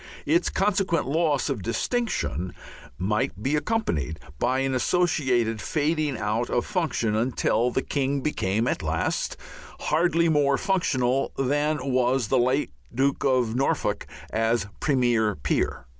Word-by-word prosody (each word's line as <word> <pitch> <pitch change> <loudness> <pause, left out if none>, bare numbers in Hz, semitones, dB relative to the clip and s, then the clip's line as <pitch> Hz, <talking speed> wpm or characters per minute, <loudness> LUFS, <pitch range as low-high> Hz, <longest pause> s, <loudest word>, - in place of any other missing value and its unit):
Its 170 +4 +2
consequent 195 -3 +1
loss 150 -1 +1
of 135 -8 -2
distinction 110 - -2 0.4
might 105 +1 -1
be 140 +3 +1
accompanied 150 - -1 0.2
by 130 - +1
an 135 0 0
associated 125 -7 +1
fading 150 0 0
out 110 +3 -1
of 120 - 0
function, 160 - 0
until 120 0 +1
the 130 +2 -1
King 140 0 -1
became 115 -6 0
at - - -1
last 80 -1 -1 0.4
hardly 170 +1 +2
more 145 -3 +3
functional 135 -9 +1
than 145 +3 +1 0.2
was 125 -2 +2
the 130 - +3
late 130 - +1 0.2
Duke 135 +3 0
of 125 -4 +2
Norfolk 135 +2 0 0.2
as 115 -1 +1
premier 120 -7 +2
peer. 70 - -1
130 Hz, 130 wpm, -25 LUFS, 115-155 Hz, 0.4 s, more